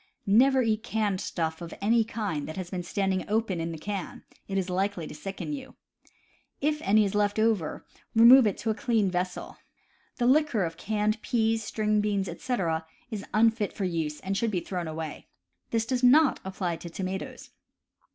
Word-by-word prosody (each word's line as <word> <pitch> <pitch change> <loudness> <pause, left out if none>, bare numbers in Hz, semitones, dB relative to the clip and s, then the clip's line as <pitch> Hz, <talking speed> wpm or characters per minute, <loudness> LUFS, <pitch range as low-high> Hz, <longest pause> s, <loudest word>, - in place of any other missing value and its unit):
Never 255 +6 +5
eat 220 -1 +1
canned 210 -4 -1
stuff 160 -1 -3
of 170 -1 -7
any 225 +3 +3
kind 210 -9 -3
that 155 - -7
has 185 -2 -5
been 185 -2 -2
standing 190 +1 -1
open 210 -5 0
in 165 +1 -3
the 165 - -6
can: 195 +2 -5 0.2
it 195 - -2
is 190 -2 0
likely 185 -1 -1
to - - -8
sicken 195 - -5
you. 270 -2 -8 0.8
If 300 +1 0
any 210 +1 +4
is 195 - -2
left 205 0 +1
over, 215 -7 0 0.3
remove 235 +2 +8
it 200 - -1
to 225 - 0
a - - +1
clean 220 -5 +1
vessel. 180 0 -3 0.6
The 240 - -1
liquor 260 -5 +3
of 165 -1 -3
canned 215 +3 -1
peas, 225 -1 +1
string 210 0 0
beans, 200 -2 0
etc., 165 -10 -2 0.2
is 210 -2 -4
unfit 220 -1 +2
for 200 - -3
use 160 -4 -2
and 195 +1 -2
should 230 +3 +1
be 190 -4 0
thrown 175 -1 -4
away; 155 -1 -6 0.4
this 225 -1 0
does 250 +1 -1
not 270 +3 +5
apply 185 -3 -3
to 170 - -8
tomatoes. 190 +2 -5
205 Hz, 180 wpm, -28 LUFS, 180-225 Hz, 0.8 s, remove